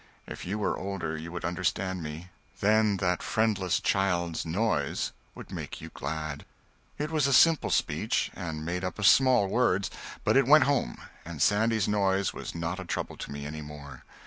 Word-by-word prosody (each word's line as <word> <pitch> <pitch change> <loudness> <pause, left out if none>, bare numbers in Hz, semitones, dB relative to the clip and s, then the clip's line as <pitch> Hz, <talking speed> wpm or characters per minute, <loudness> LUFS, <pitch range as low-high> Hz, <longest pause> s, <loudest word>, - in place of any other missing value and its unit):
If - - -8
you 100 +3 -2
were 105 - -1
older, 90 -5 -3
you 80 +2 -7
would 85 -1 -5
understand 95 +1 -1
me; 80 +3 -7 0.3
then 105 0 +3
that 90 -2 0
friendless 105 -5 +1
child's 85 -5 0
noise 85 -5 0 0.2
would - - -10
make - - -6
you - - -8
glad." 75 0 -5 0.5
It 150 +2 -3
was 150 -4 +2
a - - +1
simple 165 +4 +5
speech, - - 0
and 80 -3 -5
made 90 +2 -2
up 90 - -3
of 105 - -1
small 130 -2 +6
words, 100 -3 +1 0.3
but - - +2
it 135 -2 +4
went 155 +2 +8
home, 140 - 0 0.3
and 85 -2 -8
Sandy's 110 +3 +2
noise 100 -2 +1
was - - -7
not 85 +3 -3
a - - -5
trouble 85 - -4
to - - -7
me 70 0 -6
any 75 +1 -6
more. 75 -2 -10
95 Hz, 180 wpm, -28 LUFS, 80-105 Hz, 0.5 s, went